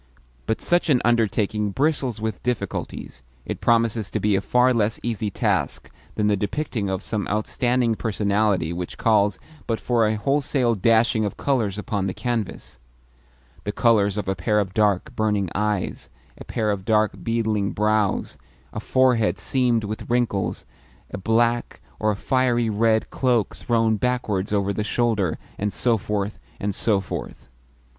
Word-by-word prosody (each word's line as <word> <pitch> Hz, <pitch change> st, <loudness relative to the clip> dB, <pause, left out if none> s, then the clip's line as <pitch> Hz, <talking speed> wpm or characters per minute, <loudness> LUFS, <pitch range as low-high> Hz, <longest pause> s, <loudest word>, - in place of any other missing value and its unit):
But 110 Hz, -, 0 dB
such 175 Hz, -1 st, +1 dB
an 130 Hz, -4 st, +5 dB
undertaking 110 Hz, -2 st, +1 dB
bristles 135 Hz, -1 st, 0 dB
with 110 Hz, -3 st, -3 dB
difficulties 105 Hz, -, -4 dB, 0.2 s
it -, -, -5 dB
promises 115 Hz, -3 st, +2 dB
to -, -, -2 dB
be 105 Hz, -1 st, +2 dB
a 95 Hz, -, +1 dB
far 125 Hz, +4 st, +3 dB
less 110 Hz, -1 st, +1 dB
easy 110 Hz, -2 st, -2 dB
task -, -, -1 dB, 0.2 s
than 105 Hz, -, 0 dB
the 105 Hz, 0 st, +3 dB
depicting 105 Hz, 0 st, -2 dB
of 95 Hz, -1 st, -2 dB
some 105 Hz, -3 st, -3 dB
outstanding 120 Hz, +3 st, +1 dB
personality 100 Hz, -5 st, 0 dB
which 90 Hz, 0 st, -5 dB
calls 105 Hz, -3 st, +3 dB, 0.3 s
but 115 Hz, -1 st, -1 dB
for 115 Hz, -2 st, +2 dB
a 110 Hz, -, +1 dB
wholesale 135 Hz, +1 st, +1 dB
dashing 110 Hz, +1 st, +3 dB
of 105 Hz, -, -3 dB
colours 115 Hz, -8 st, 0 dB
upon 100 Hz, -2 st, -2 dB
the 95 Hz, -, -4 dB
canvas 120 Hz, -5 st, -4 dB, 0.8 s
the 105 Hz, -, -2 dB
colours 105 Hz, -3 st, +3 dB
of 105 Hz, -, -3 dB
a 95 Hz, -, +1 dB
pair 105 Hz, +4 st, +1 dB
of 95 Hz, -2 st, -2 dB
dark, 105 Hz, -4 st, +1 dB
burning 105 Hz, -4 st, 0 dB
eyes, 105 Hz, -1 st, -2 dB, 0.3 s
a -, -, -10 dB
pair 110 Hz, -1 st, -1 dB
of 100 Hz, -2 st, -3 dB
dark, 110 Hz, 0 st, +2 dB
beetling 110 Hz, -3 st, 0 dB
brows, 105 Hz, -1 st, 0 dB, 0.3 s
a -, -, -3 dB
forehead 125 Hz, -1 st, +2 dB
seamed 125 Hz, -4 st, +1 dB
with 105 Hz, +3 st, -5 dB
wrinkles, 120 Hz, -5 st, 0 dB, 0.5 s
a -, -, -4 dB
black, 115 Hz, +3 st, +1 dB, 0.2 s
or 110 Hz, -, +1 dB
a 105 Hz, -, +1 dB
fiery 120 Hz, 0 st, +1 dB
red, 110 Hz, +1 st, +1 dB
cloak 120 Hz, -6 st, +1 dB
thrown 115 Hz, -2 st, +1 dB
backwards 105 Hz, -5 st, -1 dB
over 100 Hz, -1 st, +1 dB
the 105 Hz, -, -2 dB
shoulder, 110 Hz, -6 st, 0 dB, 0.2 s
and 105 Hz, +1 st, -1 dB
so 120 Hz, +2 st, +2 dB
forth, 105 Hz, 0 st, -3 dB, 0.2 s
and 100 Hz, 0 st, -2 dB
so 105 Hz, 0 st, +2 dB
forth. 95 Hz, -, -7 dB
110 Hz, 155 wpm, -23 LUFS, 100-120 Hz, 0.8 s, an